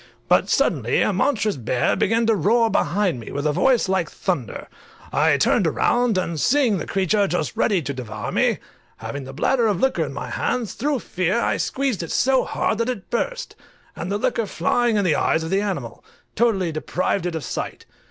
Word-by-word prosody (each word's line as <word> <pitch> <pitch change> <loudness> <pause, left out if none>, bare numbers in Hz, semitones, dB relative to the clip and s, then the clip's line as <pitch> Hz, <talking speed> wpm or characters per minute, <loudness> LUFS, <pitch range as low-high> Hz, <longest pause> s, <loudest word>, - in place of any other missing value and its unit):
But - - +3
suddenly - - +2
a - - +1
monstrous 215 - +1
bear 120 0 0
began 230 +1 +1
to 225 - +3
roar 225 +3 +2
behind 185 -7 +1
me, 115 - -9
with 145 +2 -3
a 150 - +3
voice 245 - +2
like 190 0 0
thunder. - - -3 0.5
I - - +3
turned - - +2
round, 240 -4 +1
and 170 -3 -2
seeing 240 - +2
the - - -5
creature 195 +1 +1
just 180 +3 -2
ready 200 -6 +1
to 140 - -3
devour 110 -5 -6
me, - - +2 0.4
having 140 -1 -6
the 135 - -8
bladder 235 - +1
of 200 -4 0
liquor 265 -10 +1
in 140 - -5
my 130 -3 -6
hands, 235 - -2
through 280 -1 -1
fear 185 +4 -1
I - - 0
squeezed 265 -7 -1
it 165 - -6
so 265 0 +2
hard, 220 - -1
that 230 +2 0
it 240 -7 -5
burst, - - -2 0.4
and 180 - -5
the 205 - +1
liquor 235 -1 -1
flying 230 +6 +1
in 200 - +1
the 170 - +3
eyes 160 - +1
of 160 - -5
the 195 +1 +2
animal, 175 - -4 0.3
totally 205 -7 +1
deprived 175 +3 -1
it 175 - -4
of 160 - -4
sight. - - -5
200 Hz, 200 wpm, -22 LUFS, 160-235 Hz, 0.5 s, But